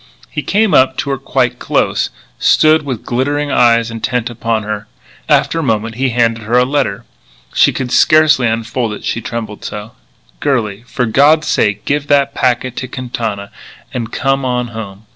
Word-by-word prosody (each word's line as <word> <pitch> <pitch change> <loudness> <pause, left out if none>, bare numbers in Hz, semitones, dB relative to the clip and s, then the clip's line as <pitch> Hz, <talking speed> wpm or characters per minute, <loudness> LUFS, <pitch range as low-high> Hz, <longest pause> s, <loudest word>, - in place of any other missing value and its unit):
He 150 - -3
came 210 +5 +1
up 130 0 +4
to 140 - -2
her 135 - -2
quite 125 -2 0
close, - - 0 0.3
stood 155 +1 +4
with 130 -6 -5
glittering 145 +4 -1
eyes 115 -2 +3
intent 120 +1 -2
upon 115 -1 -2
her. 105 0 -5 0.4
After 165 - +2
a - - -1
moment 115 -3 -1
he 130 +3 0
handed 115 -1 +1
her 120 +3 +2
a 125 - +4
letter. 130 -7 -1 0.5
She - - +4
could 125 -2 -4
scarcely 155 -5 +4
unfold 115 0 -2
it, 105 - -8
she 115 - -2
trembled 110 -2 -6
so: 105 +1 -6 0.5
"Girlie, 115 -8 -1
for 125 - -1
God's 145 +7 +4
sake 105 -1 0
give 145 0 -1
that 140 -1 +2
packet 125 0 0
to 130 - -3
Quintana 115 -6 -5 0.4
and 115 -2 -4
come 135 0 0
on 125 -1 -1
home. 110 -2 -8
125 Hz, 170 wpm, -15 LUFS, 115-135 Hz, 0.5 s, up